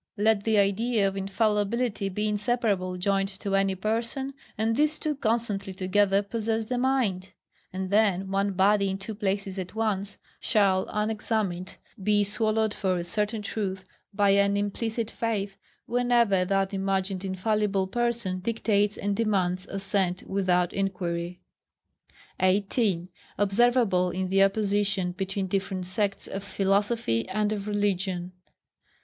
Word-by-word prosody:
Let 210 Hz, 0 st, +2 dB
the 220 Hz, -1 st, +3 dB
idea 205 Hz, +2 st, +2 dB
of 195 Hz, -, -3 dB
infallibility 210 Hz, +2 st, 0 dB
be 210 Hz, +3 st, -2 dB
inseparably 205 Hz, -4 st, 0 dB
joined 195 Hz, +1 st, +1 dB
to 195 Hz, -1 st, -1 dB
any 195 Hz, -1 st, +2 dB
person, 230 Hz, +7 st, -2 dB, 0.2 s
and 220 Hz, +2 st, +1 dB
these 300 Hz, +3 st, +2 dB
two 305 Hz, -, -1 dB
constantly 220 Hz, -6 st, -1 dB
together 195 Hz, +1 st, +2 dB
possess 225 Hz, +1 st, -2 dB
the 245 Hz, +2 st, -2 dB
mind; 245 Hz, -8 st, 0 dB, 0.4 s
and 190 Hz, 0 st, -4 dB
then 195 Hz, -3 st, +2 dB
one 195 Hz, 0 st, +1 dB
body 200 Hz, +1 st, +3 dB
in 190 Hz, -, -2 dB
two 195 Hz, +3 st, -6 dB
places 195 Hz, -2 st, -2 dB
at 185 Hz, +3 st, -6 dB
once, 205 Hz, -3 st, -1 dB, 0.2 s
shall 195 Hz, -4 st, +2 dB
unexamined 210 Hz, -4 st, -2 dB, 0.3 s
be 205 Hz, +1 st, +3 dB
swallowed 215 Hz, +1 st, 0 dB
for 190 Hz, -3 st, 0 dB
a 175 Hz, -, -2 dB
certain 210 Hz, +4 st, -2 dB
truth, 195 Hz, -3 st, -3 dB, 0.3 s
by 200 Hz, -1 st, +3 dB
an 200 Hz, 0 st, +3 dB
implicit 220 Hz, +2 st, -2 dB
faith, 205 Hz, -4 st, -2 dB, 0.3 s
whenever 235 Hz, -6 st, +2 dB
that 195 Hz, +1 st, 0 dB
imagined 195 Hz, -1 st, -1 dB
infallible 195 Hz, +1 st, 0 dB
person 235 Hz, -3 st, -1 dB
dictates 210 Hz, 0 st, +1 dB
and 200 Hz, 0 st, -1 dB
demands 190 Hz, -4 st, 0 dB
assent 195 Hz, -2 st, 0 dB
without 180 Hz, -3 st, +1 dB
inquiry. 180 Hz, -3 st, -2 dB, 1.0 s
18. 195 Hz, -1 st, +1 dB, 0.3 s
Observable 205 Hz, -2 st, +3 dB
in 185 Hz, +1 st, -2 dB
the 195 Hz, +1 st, +3 dB
opposition 200 Hz, -2 st, +1 dB
between 195 Hz, +2 st, -3 dB
different 190 Hz, -1 st, -2 dB
Sects 195 Hz, +2 st, 0 dB
of 195 Hz, 0 st, -5 dB
philosophy 200 Hz, -, 0 dB
and 210 Hz, +2 st, 0 dB
of 205 Hz, -1 st, -5 dB
religion. 190 Hz, -3 st, -1 dB
200 Hz, 130 wpm, -27 LUFS, 190-215 Hz, 1.0 s, the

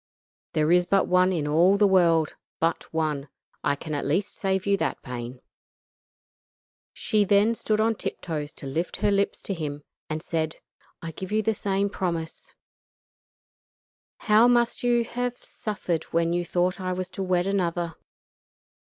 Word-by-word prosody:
There 155 Hz, +1 st, +2 dB
is 180 Hz, 0 st, +4 dB
but 195 Hz, -1 st, +3 dB
one 185 Hz, +1 st, +4 dB
in 160 Hz, -5 st, -1 dB
all 175 Hz, +6 st, +4 dB
the 205 Hz, -, +5 dB
world 170 Hz, -5 st, +4 dB, 0.3 s
but 165 Hz, +1 st, -1 dB
one. 155 Hz, -3 st, -1 dB, 0.3 s
I 140 Hz, -, +2 dB
can 155 Hz, +2 st, -6 dB
at 145 Hz, -, -1 dB
least 180 Hz, +8 st, 0 dB
save 190 Hz, -1 st, -1 dB
you 200 Hz, 0 st, +3 dB
that -, -, -2 dB
pain." 125 Hz, 0 st, -6 dB, 1.5 s
She 215 Hz, -1 st, +1 dB
then 205 Hz, +3 st, +4 dB
stood 215 Hz, -1 st, -1 dB
on 225 Hz, +1 st, +3 dB
tip -, -, -5 dB
toes 150 Hz, -3 st, -4 dB
to -, -, -10 dB
lift 160 Hz, +6 st, -2 dB
her 205 Hz, -, +2 dB
lips 200 Hz, 0 st, 0 dB
to 195 Hz, -, -2 dB
him, 150 Hz, -4 st, -5 dB, 0.3 s
and 155 Hz, +1 st, -3 dB
said: 160 Hz, -2 st, -2 dB, 0.5 s
"I 165 Hz, -, -4 dB
give 190 Hz, +4 st, -7 dB
you 215 Hz, +1 st, +2 dB
the 220 Hz, -, +2 dB
same 200 Hz, -1 st, 0 dB
promise. 170 Hz, -5 st, -4 dB, 1.7 s
How 220 Hz, +2 st, +5 dB
you 245 Hz, -, +5 dB
must 240 Hz, -1 st, +1 dB
have 245 Hz, 0 st, 0 dB
suffered 180 Hz, -6 st, -4 dB
when 170 Hz, 0 st, 0 dB
you 175 Hz, 0 st, 0 dB
thought 180 Hz, +2 st, 0 dB
I 185 Hz, 0 st, -1 dB
was 185 Hz, 0 st, -4 dB
to -, -, -5 dB
wed 180 Hz, -1 st, +1 dB
another." 175 Hz, -4 st, -1 dB
180 Hz, 165 wpm, -26 LUFS, 160-200 Hz, 1.7 s, the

